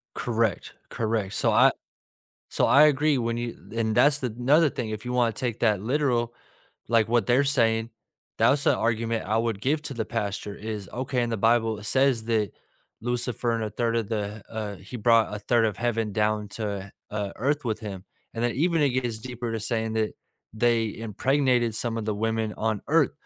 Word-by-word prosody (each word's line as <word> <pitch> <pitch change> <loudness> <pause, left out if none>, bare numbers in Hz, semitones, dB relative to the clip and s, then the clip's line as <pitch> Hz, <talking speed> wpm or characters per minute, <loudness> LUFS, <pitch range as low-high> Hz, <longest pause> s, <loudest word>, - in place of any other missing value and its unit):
Correct. 115 -3 -1 0.2
Correct. 110 -4 -2
So - - +2
I - - +6 0.8
So - - +1
I 150 +2 +7
agree, 150 -1 +3
when 115 0 -1
you 120 0 -4 0.2
and 110 -1 0
that's 145 +4 +4
another 130 +6 +3
thing, 115 -3 -4 0.2
you 125 - -3
wanna 120 -2 +2
take 120 -1 -3
that 105 -4 +2
literal, 120 -2 0 0.6
like 115 -2 +3
what 120 -3 +2
they're 130 +5 +3
saying, 115 -5 +2 0.5
that's 140 +2 +3
a - - +4
argument 115 -1 -1
I 110 +3 +1
would 115 -3 -1
give 150 +5 +1
to 140 - -4
the 115 -2 -2
pastor 105 -2 -3
is, 105 -2 -6
okay, 130 0 -1
in 120 - -2
the 115 - -2
Bible 115 0 +2
it 105 - -9
says 130 -2 +2
that 110 -4 0 0.5
Lucifer 120 0 0
and 115 -1 -1
a 110 - -2
third 115 +1 -1
of 115 -2 -1
the, 105 -1 -3
uh, 110 -2 -4
he 100 +6 -9
brought 115 -1 +3
a 105 - -4
third 115 +2 +2
of 105 - -2
heaven 115 -3 -1
down 105 0 0
to, 100 -2 -4 0.2
uh, 105 -2 -3
earth 145 +4 0
with 110 -2 -2
him. 100 -4 -7 0.3
And 115 +1 -3
then 120 - +2
even 165 +3 +2
it 145 - +4
gets 125 -3 -2
deeper 120 0 -5
to 115 - -2
saying 110 0 -1
that 110 -1 0 0.4
they 115 -1 +1
impregnated 120 +1 +1
some 115 0 -1
of 115 - -3
the 110 -1 -1
women 110 0 -1
on 110 -2 -1
earth. 155 -1 +3
115 Hz, 195 wpm, -26 LUFS, 110-125 Hz, 0.8 s, I